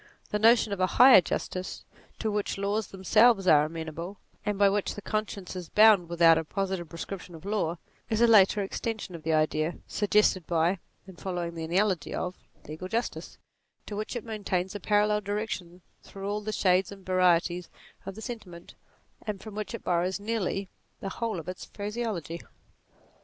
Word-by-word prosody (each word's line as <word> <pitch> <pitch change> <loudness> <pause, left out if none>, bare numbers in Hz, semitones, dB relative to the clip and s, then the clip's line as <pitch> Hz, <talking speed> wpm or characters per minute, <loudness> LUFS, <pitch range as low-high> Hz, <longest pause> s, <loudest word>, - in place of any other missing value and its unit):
The 210 - 0
notion 225 -1 +5
of 200 - -4
a 185 - +3
higher 255 -5 +9
justice, 185 +1 -4 0.3
to 220 - -2
which 205 -1 -2
laws 200 +1 -1
themselves 195 +2 +4
are 150 -3 +6
amenable, 165 +4 -6 0.3
and 210 -1 -1
by 200 0 +5
which 200 0 0
the 205 - -7
conscience 205 -3 -3
is 180 -3 -6
bound 210 -5 +6
with 170 0 -1
out 165 -1 +8
a - - -3
positive 190 0 -3
prescription 175 +1 -7
of 160 - -12
law, 200 -5 -1 0.3
is 220 -2 0
a 235 - +6
later 210 -2 +5
extension 220 0 -4
of 165 - -8
the 160 +1 -1
idea, 155 +1 +1
suggested 205 -4 +2
by, 170 +2 +1 0.3
and 190 -3 -13
following 175 -3 -3
the 165 -1 -5
analogy 185 +2 +1
NATURE 180 - -2
53 - - -30 0.2
of, - - -17
legal 155 +4 -6
justice, 230 +5 -3 0.5
to 210 - -6
which 215 +4 -4
it 240 - -4
maintains 195 -4 -2
a 205 - -5
parallel 210 +1 +2
direction 195 -4 -4 0.2
through 195 0 -8
all 205 +1 -2
the 215 +1 -4
shades 185 -2 +2
and 195 -2 -12
varieties 180 -1 +2 0.3
of 195 - -7
the 220 - -9
sentiment, 185 -8 -8 0.5
and 210 -2 -3
from 215 +1 -10
which 215 +2 -4
it - - -9
borrows 180 +2 0
nearly 200 -2 -2 0.3
the 195 - -4
whole 225 -2 -3
of 165 - -10
its 185 0 -6
phraseology. 205 -6 -4
195 Hz, 185 wpm, -28 LUFS, 175-210 Hz, 0.5 s, higher